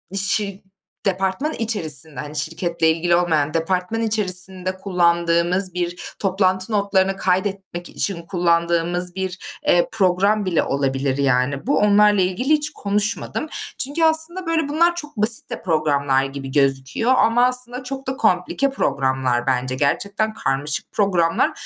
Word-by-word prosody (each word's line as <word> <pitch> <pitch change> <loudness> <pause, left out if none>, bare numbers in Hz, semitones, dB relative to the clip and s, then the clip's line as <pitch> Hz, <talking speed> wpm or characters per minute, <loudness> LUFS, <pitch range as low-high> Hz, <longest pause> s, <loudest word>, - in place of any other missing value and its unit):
şir 200 0 +2 0.4
departman 195 - -1
içerisinde, 160 - +1
hani, 150 +1 -7
şirketle 165 +2 0
ilgili 170 +2 +1
olmayan, 155 -4 0
departman 180 +6 -1
içerisinde 185 -4 +1
kullandığımız 175 0 +1
bir 175 0 -5
toplantı 190 0 0
notlarını 195 -2 +1
kaydetmek 190 -1 -2
için 190 -4 -1
kullandığımız 170 0 0
bir, 190 -1 -4 0.3
eee, 175 0 +3
program 200 +1 +1
bile 175 -4 +1
olabilir 135 -1 -1
yani 135 - 0
bu. 285 - +2
Onlarla 210 -1 +4
ilgili 185 +9 -2
hiç 305 -1 +2
konuşmadım. 210 +8 -2 0.3
Çünkü 290 +5 -1
aslında, 320 +3 +2
böyle, 325 -3 0
bunlar 340 +4 +2
çok 295 -6 -5
basit 215 +2 +2
de - - -6
programlar 145 -5 +1
gibi 135 0 -7
gözüküyor 140 - +1
ama 235 +2 +3
aslında 250 0 +1
çok 270 +1 -6
da 265 0 -3
komplike 215 +5 +1
programlar 130 - -1
bence. 130 0 -1
Gerçekten 200 +10 -1
karmaşık 140 -3 -2
programlar. 180 -5 +1
185 Hz, 130 wpm, -20 LUFS, 160-215 Hz, 0.4 s, Onlarla